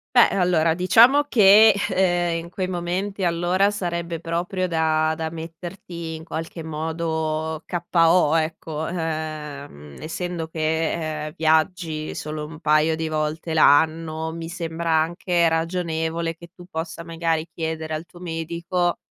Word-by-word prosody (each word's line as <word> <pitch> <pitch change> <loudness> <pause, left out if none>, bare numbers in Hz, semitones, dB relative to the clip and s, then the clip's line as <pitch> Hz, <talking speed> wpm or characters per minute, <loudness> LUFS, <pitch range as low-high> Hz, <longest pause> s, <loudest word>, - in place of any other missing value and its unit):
Beh 245 - +7
allora 175 -4 +2
diciamo 235 +11 +5
che, 215 -3 +7 0.2
ehm, 175 -2 +1
in - - -11
quei 185 +1 -3
momenti 185 +2 -2
allora 175 +3 +2
sarebbe 170 -4 -3
proprio 175 +3 -2
da 160 -2 +1
da 160 -1 -2
metterti 165 +1 -7
in 160 - -9
qualche 165 0 -6
modo 160 0 -2
KO, 170 -2 +3
ecco. 160 -1 -3
Ehm, 150 - -5
essendo 165 +1 -4
che, 160 -1 -1
ehm, 155 - -7
viaggi 160 0 0
solo 150 0 -5
un 155 +1 -11
paio 155 +1 +3
di 160 0 -3
volte 155 +1 -2
l'anno, 160 +1 +3
mi 165 0 -6
sembra 165 -1 -3
anche 170 +1 +2
ragionevole 165 0 -1
che 170 - -12
tu 180 - -12
possa, 165 +1 -5
magari, 165 -1 -1
chiedere 160 -1 -4
al 155 +2 -4
tuo 175 +1 -16
medico 170 +1 -2
165 Hz, 130 wpm, -23 LUFS, 160-175 Hz, 0.2 s, Beh